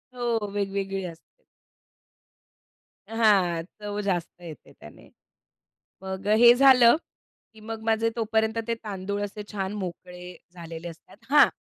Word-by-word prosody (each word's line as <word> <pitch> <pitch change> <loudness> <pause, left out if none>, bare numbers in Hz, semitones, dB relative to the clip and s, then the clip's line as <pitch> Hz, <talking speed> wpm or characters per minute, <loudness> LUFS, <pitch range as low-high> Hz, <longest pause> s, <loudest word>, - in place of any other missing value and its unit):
हो, 235 -4 -1
वेगवेगळी 195 -1 -2
असते. 175 - -13 1.6
हां, 200 -7 +2 0.2
चव 205 0 -4
जास्त 180 -3 -3
येते 165 -4 -11
त्याने. - - -15 0.9
मग 190 0 -6
हे 240 +1 +8
झालं, 255 -1 +6 0.6
की 220 - -16
मग 225 +1 -7
माझे 225 0 +1
तोपर्यंत 220 0 0
ते 230 - +1
तांदूळ 200 0 -4
असे 210 +1 -7
छान 195 -1 -3
मोकळे 180 -2 -7 0.2
झालेले 170 -1 -8
असतात. 165 +3 -14
हां, 290 -1 +7
205 Hz, 120 wpm, -26 LUFS, 180-225 Hz, 1.6 s, हे